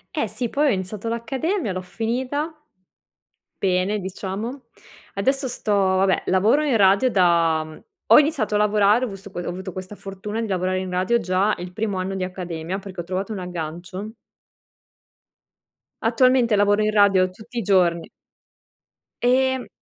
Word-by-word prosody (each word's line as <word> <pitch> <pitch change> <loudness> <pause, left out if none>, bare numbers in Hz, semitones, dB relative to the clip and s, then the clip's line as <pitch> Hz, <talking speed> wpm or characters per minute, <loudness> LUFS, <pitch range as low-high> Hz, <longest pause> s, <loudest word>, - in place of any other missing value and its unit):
Eh 260 -8 0
sì 230 +3 -4
poi 295 +1 +1
ho 275 - +4
iniziato 200 +3 -3
l'accademia, 245 - -2
l'ho 185 - -3
finita, 255 - -3 1.1
bene 190 +2 +1
diciamo. 200 +7 -5 0.5
Adesso 265 +7 0
sto 215 -3 -2
vabbè 190 -1 +2
lavoro 210 +11 +3
in 285 -5 +1
radio 200 +5 +4
da 170 -4 +3 0.5
ho - - +9
iniziato 295 -8 0
a - - +3
lavorare 210 +3 +3
ho - - -5
vist 195 0 -9
ho - - -9
avuto 185 0 -6
questa 185 +2 -7
fortuna 200 +3 -6
di 225 - -2
lavorare 185 -1 -1
in 185 0 -4
radio 185 +7 +1
già 190 +3 +1
il 180 0 -7
primo 210 -2 -2
anno 190 +1 -3
di 190 - -2
accademia 180 -1 -5
perché 190 -2 -7
ho - - -8
trovato 190 +4 -4
un 200 - -5
aggancio. 180 +4 -6 1.9
Attualmente 255 -4 +3
lavoro 205 +1 +3
in 215 - +1
radio 200 -3 +4
tutti 235 +5 -12
i 230 - 0
giorni 175 -4 +2 1.1
Ehm 260 +1 +2
200 Hz, 150 wpm, -22 LUFS, 185-235 Hz, 1.9 s, ho